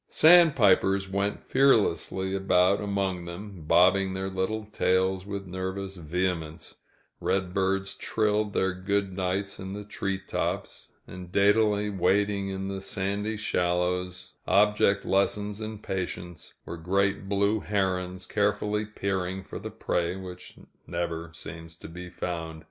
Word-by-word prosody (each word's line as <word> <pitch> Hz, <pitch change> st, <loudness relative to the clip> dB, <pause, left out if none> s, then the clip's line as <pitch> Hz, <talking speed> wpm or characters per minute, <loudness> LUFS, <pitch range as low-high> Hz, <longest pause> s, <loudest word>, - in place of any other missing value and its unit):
Sand 165 Hz, -1 st, +7 dB
pipers 95 Hz, -3 st, +4 dB
went 100 Hz, +1 st, -1 dB
fearlessly 105 Hz, -7 st, +2 dB
about 95 Hz, +1 st, +3 dB
among 100 Hz, -3 st, -1 dB
them, 95 Hz, +1 st, -8 dB
bobbing 95 Hz, +3 st, +4 dB
their 95 Hz, 0 st, -3 dB
little 95 Hz, +4 st, -2 dB
tails 95 Hz, -2 st, +1 dB
with 100 Hz, -1 st, -4 dB
nervous 95 Hz, +1 st, -4 dB
vehemence; 85 Hz, -1 st, -3 dB, 0.5 s
redbirds 95 Hz, +1 st, 0 dB
trilled 105 Hz, -1 st, 0 dB
their 95 Hz, -1 st, +1 dB
good 95 Hz, +1 st, -1 dB
nights 95 Hz, +2 st, -2 dB
in 95 Hz, 0 st, -6 dB
the 105 Hz, +1 st, -5 dB
tree 95 Hz, -1 st, -3 dB
tops; 95 Hz, -, -4 dB, 0.2 s
and, 90 Hz, -1 st, -10 dB
daintily 105 Hz, +1 st, +3 dB
wading 100 Hz, +1 st, +1 dB
in 95 Hz, 0 st, -4 dB
the 95 Hz, 0 st, -4 dB
sandy 100 Hz, +2 st, -2 dB
shallows, 90 Hz, -2 st, -1 dB
object 100 Hz, 0 st, +3 dB
lessons 100 Hz, +2 st, 0 dB
in 110 Hz, 0 st, -5 dB
patience, 90 Hz, -4 st, -5 dB
were 85 Hz, -, -6 dB
great 95 Hz, +3 st, 0 dB
blue 100 Hz, +2 st, +2 dB
herons, 95 Hz, -2 st, -1 dB
carefully 105 Hz, +1 st, 0 dB
peering 95 Hz, -2 st, -2 dB
for -, -, -7 dB
the -, -, -6 dB
prey 85 Hz, +1 st, -1 dB
which 90 Hz, -2 st, -9 dB, 0.3 s
never 85 Hz, -1 st, -3 dB
seems 80 Hz, 0 st, -9 dB
to -, -, -11 dB
be 90 Hz, +2 st, -8 dB
found. 80 Hz, -2 st, -4 dB
95 Hz, 130 wpm, -27 LUFS, 90-100 Hz, 0.5 s, Sand